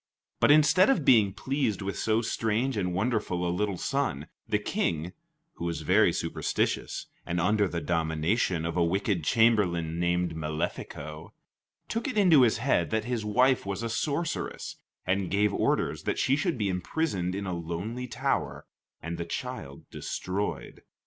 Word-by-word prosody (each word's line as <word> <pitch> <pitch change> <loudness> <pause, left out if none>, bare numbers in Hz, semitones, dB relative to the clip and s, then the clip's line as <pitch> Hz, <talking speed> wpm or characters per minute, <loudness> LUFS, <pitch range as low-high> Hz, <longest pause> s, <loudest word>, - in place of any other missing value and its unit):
But - - +4
instead 155 - +6
of 175 - +2
being 110 -6 +5
pleased 130 -3 -1
with 100 0 -3
so 110 +1 +1
strange 115 +3 0
and 90 -3 -1
wonderful 100 -3 -1
a 85 - 0
little 100 -1 -1
son, 135 - -1 0.2
the - - +3
King 85 +1 -2 0.4
(who 85 - -4
was 85 -2 -2
very 80 - +4
superstitious - - -2 0.2
and 85 +1 -2
under 105 +3 +2
the 85 -1 -3
domination 80 +2 0
of 85 +1 -3
wicked 90 +1 +1
chamberlain 90 -7 +2
named 85 0 +1
Malefico) 75 0 -5 0.5
took 230 +5 -2
it 255 - -3
into 175 -9 +6
his 115 -4 +4
head 115 -8 +1
that 110 -1 -1
his 120 -3 -2
wife 125 +5 +3
was 100 +3 -4
a 115 - -2
sorceress, 150 +7 -2 0.3
and 95 0 0
gave 100 +1 +2
orders - - 0
that - - -2
she 135 - +2
should 155 0 -1
be 105 -3 0
imprisoned 95 - -1
in 100 0 -3
a 90 - -3
lonely 90 +9 -4
tower - - -2 0.4
and 85 +1 -4
the - - -1
child 70 -4 -6
destroyed. 100 +3 -4
100 Hz, 155 wpm, -28 LUFS, 85-120 Hz, 0.5 s, instead